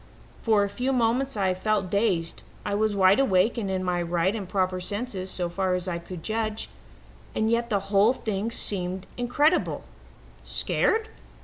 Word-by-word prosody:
"For 215 -3 +3
a - - 0
few 250 +6 -2
moments 250 +1 +1
I 190 -2 +2
felt 195 0 -1
dazed. 195 -6 0 0.2
I 205 - -1
was 210 0 +1
wide 190 +2 +5
awake 225 -2 +3
and 200 -4 -3
in 190 -1 -1
my 180 -1 0
right 175 +4 0
and 195 -4 -5
proper 185 -1 0
senses 200 -1 -3
so 180 -2 -2
far 185 +1 0
as 180 0 -3
I 170 -2 -2
could 170 -1 -9
judge, 220 +1 -2 0.6
and 220 +1 +1
yet 235 0 +1
the 205 -3 +2
whole 205 +5 +5
thing 215 -3 -3
seemed 185 -4 +1
incredible. 265 +6 +1 0.6
Scared? 445 0 0
200 Hz, 170 wpm, -26 LUFS, 185-225 Hz, 0.6 s, wide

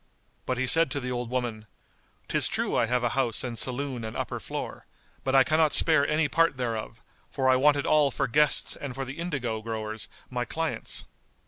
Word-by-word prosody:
But 130 - -1
he 130 - 0
said 165 +4 +5
to 140 +1 -2
the 125 -1 -4
old 120 -1 -3
woman, 120 -4 -3 0.6
"'Tis - - +2
true - - -1
I 115 - +2
have 125 +1 0
a 120 - +2
house 120 -3 0
and 120 -2 -4
saloon 130 0 -2
and 110 0 -5
upper - - -3
floor; - - -6 0.4
but 135 0 0
I 135 - +7
cannot 155 +3 +2
spare 155 -4 +5
any 155 0 +2
part 165 -3 +2
thereof, 115 -2 -4 0.3
for 130 -2 -1
I 130 - +6
want 145 +3 +4
it 140 - -2
all 150 -2 +4
for 135 - -1
guests 150 +5 +3
and 135 -4 -7
for 135 0 -3
the 135 +5 -8
indigo 130 -10 -3
growers 110 -1 -4 0.2
my 125 -1 -1
clients." 165 +5 -4
130 Hz, 205 wpm, -27 LUFS, 120-145 Hz, 0.6 s, I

